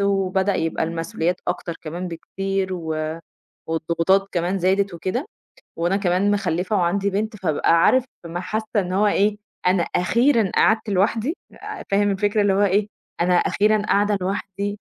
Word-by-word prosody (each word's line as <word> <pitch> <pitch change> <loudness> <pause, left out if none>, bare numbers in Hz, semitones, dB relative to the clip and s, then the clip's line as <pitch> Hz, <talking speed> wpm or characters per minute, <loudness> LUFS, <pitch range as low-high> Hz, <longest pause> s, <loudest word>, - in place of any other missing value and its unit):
وبدأ 195 0 +1
يبقى 160 0 -1
المسئوليات 170 +2 -2
أكتر 170 - -3
كمان 175 +3 -5
بكتير 195 +3 -3
و 160 -1 -3 0.5
والضغوطات 170 +4 +1
كمان 180 +2 -1
زادت 190 +1 +1
وكده، 190 - -3 0.5
وأنا 175 +4 +1
كمان 195 +1 +1
مخلّفة 185 0 0
وعندي 195 +2 +1
بنت، 215 +3 -2
فبابقى 165 -3 +2
عارف 260 -1 +4 0.2
ما 170 +1 -4
حاسّة 215 +4 -3
إن 185 -2 0
هو 210 +2 +3
إيه 205 +1 +2 0.3
أنا 180 -2 +3
أخيرًا 230 +4 +2
قعدت 220 -1 +3
لوحدي 220 - +1 0.2
آآ، - - -8
فاهم 205 0 +3
الفكرة 205 +2 +1
اللي 205 -1 +3
هو 200 +1 +3
إيه، 200 +1 +2 0.3
أنا 180 +1 +3
أخيرًا 210 +4 +2
قاعدة 205 0 +2
لوحدي 200 +2 -3
195 Hz, 150 wpm, -22 LUFS, 175-205 Hz, 0.5 s, عارف